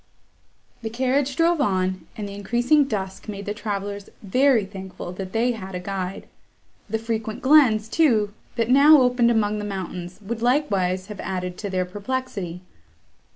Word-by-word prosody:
The 225 - -3
carriage 260 +3 0
drove 335 -1 +3
on, 185 -6 0
and 210 -2 -4
the 200 - -7
increasing 240 +8 +2
dusk 195 -6 -4
made 200 -1 -6
the 205 - -2
travellers 200 -2 -4
very 250 +2 +3
thankful 190 -2 -8
that 185 +1 -6
they 235 +4 +2
had 190 -5 -6
a - - -2
guide; 190 0 -5 0.6
the 220 - 0
frequent 220 -1 -4
glens, 260 -7 +5
too, 220 -8 +2 0.2
that 230 -2 0
now 290 +3 +8
opened 250 -2 +3
among 215 -2 +1
the - - -4
mountains, 185 -2 -5
would 225 +3 -4
likewise 200 -9 +1
have 210 -1 -9
added 180 -1 -3
to 205 - -4
their 185 -1 0
perplexity. 200 -3 -4
210 Hz, 155 wpm, -23 LUFS, 190-245 Hz, 0.6 s, now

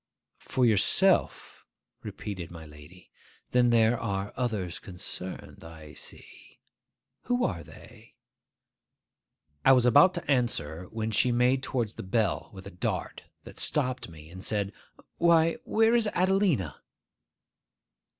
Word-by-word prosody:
'For 130 - 0
yourself?' 105 -5 +2 0.4
repeated 95 -5 -6
my 80 -2 -10
lady. 75 +4 -15 0.4
'Then 125 -1 +4
there 115 0 +3
are 100 -3 -3
others 105 -9 -2
concerned, 90 0 -8
I 80 -2 -12
see. - - -12 0.7
Who 245 0 +1
are 90 -7 -2
they?' - - -16 1.5
I 135 - +7
was 125 -2 +4
about 180 +10 +6
to 170 - -5
answer, 90 - 0
when 110 0 -3
she 125 +4 +2
made 125 +2 +2
towards 120 -5 -2
the - - -8
bell 100 0 -1
with 95 -2 -11
a 100 - -8
dart 90 - -3 0.2
that - - -10
stopped 130 -7 -1
me, 80 -1 -13
and 95 +1 -9
said, 100 -2 -1 0.5
'Why, 165 -1 +4
where 225 +1 +3
is 235 -2 +3
Adelina? 185 - +1
110 Hz, 125 wpm, -28 LUFS, 90-130 Hz, 1.5 s, I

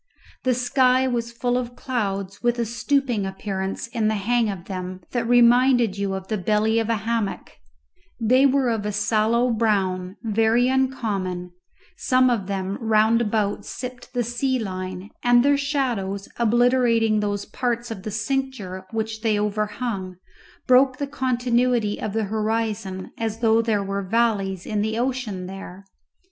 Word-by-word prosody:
The 255 -1 +3
sky 255 +1 +3
was 235 -2 -2
full 245 +1 0
of 245 -1 -6
clouds, 200 -6 -3
with 240 0 +1
a 235 - 0
stooping 235 0 0
appearance 190 +1 -4
in 230 -3 -1
the 215 - +1
hang 225 +2 +1
of 190 -3 -6
them 185 -1 -6
that 235 -2 -1
reminded 245 -2 +5
you 200 -1 -2
of 190 0 -6
the 215 0 -2
belly 215 +4 +2
of 225 0 -2
a 230 - +2
hammock; 225 -3 -2 0.7
they 255 +4 +4
were 265 -2 +2
of 220 -2 -1
a 210 - -2
sallow 220 +4 +2
brown, 195 -4 0
very 225 +2 +2
uncommon; 210 -9 -1 0.5
some 255 -1 +3
of 205 -6 -1
them 195 0 -3
round 220 +1 +3
about 210 -2 0
sipped 250 -1 -7
the 245 - +1
sea 255 +3 -1
line, 185 -2 -5
and 245 +1 +5
their 285 0 +5
shadows, 245 -9 -1
obliterating 235 -1 +3
those 205 -1 -2
parts 240 0 -2
of 205 -4 -6
the 215 - -5
cincture 215 -4 -3
which 220 0 -3
they 215 -2 +1
overhung, 210 -2 -2 0.5
broke 255 +1 +5
the 285 - -2
continuity 245 -4 0
of 210 - -3
the 220 0 0
horizon 215 -2 -2
as 225 -1 -2
though 225 -1 +4
there 220 -3 0
were 195 0 -2
valleys 195 -3 0
in 210 -1 -1
the 220 +1 -1
ocean 240 -7 -2
there. 195 0 -9
225 Hz, 155 wpm, -23 LUFS, 200-245 Hz, 0.7 s, reminded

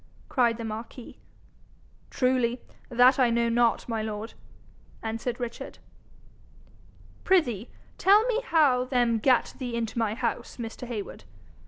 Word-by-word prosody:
cried 240 -4 +2
the 230 - -5
marquis. 225 +2 -8 0.9
'Truly, 250 -1 +1 0.3
that 250 +2 +5
I 250 -2 +4
know 235 0 +1
not, 235 0 +2
my 225 -2 -2
lord,' 215 +1 -5 0.7
answered 225 +2 -3
Richard. 240 -1 -6 1.5
'Prithee 250 - +1 0.3
tell 405 +3 +6
me 485 -1 0
how 295 - +3
them 245 -3 +1
gat 255 +2 +2
thee 245 -3 -4
into 235 0 -3
my 220 -2 0
house, 235 -1 -3
Mr. 235 +1 -7
Heywood? 210 - -6
235 Hz, 125 wpm, -27 LUFS, 230-255 Hz, 1.5 s, tell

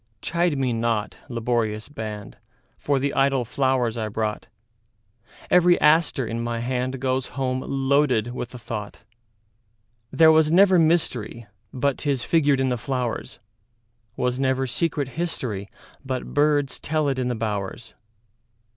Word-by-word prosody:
Chide 170 +1 0
me 130 -3 0
not, 115 -2 -1
laborious 115 -3 -1
band, 110 -6 -7 0.4
For 140 -1 0
the 140 +1 -1
idle 135 -2 +2
flowers 125 -2 0
I 110 - -2
brought; 105 0 -3 1.0
Every 180 0 +5
aster 150 -4 +3
in 115 +1 -3
my 120 0 -2
handGoes 130 +1 -1
home 130 -1 -1
loaded 135 -4 +1
with 125 -1 -5
a - - -6
thought. 105 -3 -7 1.1
There 160 +3 +6
was 160 -1 +4
never 185 +1 +6
mysteryBut 125 - -1
'tis 140 -5 -1
figured 145 -3 +2
in 130 0 +1
the 125 - 0
flowers; 125 -1 -3 0.8
SWas 125 +1 -1
never 130 0 +1
secret 145 +1 -1
historyBut 130 - -5
birds 145 -1 +2
tell 155 -1 -1
it 135 -2 -1
in 125 - -1
the 125 - -1
bowers. 110 0 -4
130 Hz, 130 wpm, -24 LUFS, 115-145 Hz, 1.1 s, There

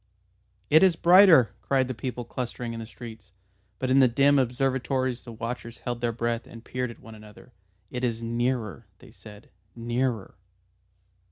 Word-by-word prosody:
"It 155 - +7
is 190 -3 +5
brighter!" 170 - +6
cried 130 -2 +1
the 130 - -3
people 120 +1 -5
clustering 120 -1 -5
in 115 - -6
the 110 - -7
streets. 115 -3 -11 0.4
But 130 -1 -2
in 135 - +5
the 130 - +6
dim 140 +4 +3
observatories 130 0 -1
the 120 - -10
watchers 115 +1 -6
held 120 -1 -5
their 120 -1 0
breath 115 0 -3
and 115 0 -13
peered 125 0 -3
at 115 - -11
one 115 - -13
another. 110 +3 -15 0.4
"It 125 0 -5
is 115 -2 -1
nearer," 115 -2 -2
they 125 - -16
said. 105 -2 -15 0.3
"_Nearer! 120 -2 -2
120 Hz, 165 wpm, -26 LUFS, 115-130 Hz, 0.4 s, It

